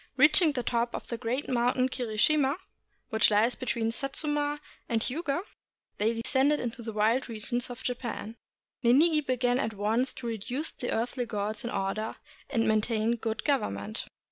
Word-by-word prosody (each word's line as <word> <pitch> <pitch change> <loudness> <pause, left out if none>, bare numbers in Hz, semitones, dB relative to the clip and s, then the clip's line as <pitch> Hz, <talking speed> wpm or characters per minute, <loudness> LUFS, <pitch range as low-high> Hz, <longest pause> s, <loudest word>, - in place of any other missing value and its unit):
Reaching 305 +3 +6
the 250 -3 -2
top 235 0 0
of - - -7
the 235 - -2
great 250 +4 -2
mountain 250 +1 +2
Kirishima, 265 +4 +2 0.5
which 220 -1 +5
lies 215 +4 +3
between 230 -3 -1
Satsuma 290 +3 -1 0.3
and 230 -2 +2
Hiuga, 300 +5 -1 0.6
they 215 +2 +3
descended 265 +6 +2
into 240 0 -4
the 225 -1 -5
wild 220 +5 +2
regions 240 +3 -2
of 245 - -8
Japan. 235 -3 -4 0.5
Ninigi 300 +6 +5
began 250 -1 +1
at 220 -4 -2
once 225 +6 +1
to 245 - -9
reduce 235 +7 -3
the 245 - -4
earthly 240 +2 -1
gods 210 0 -3
in 240 - -3
or 195 -3 -1
der, 215 +1 -4 0.3
and 230 -5 +1
maintain 220 +1 +2
good 225 -1 -3
government. 105 - -1
240 Hz, 160 wpm, -29 LUFS, 220-265 Hz, 0.6 s, Reaching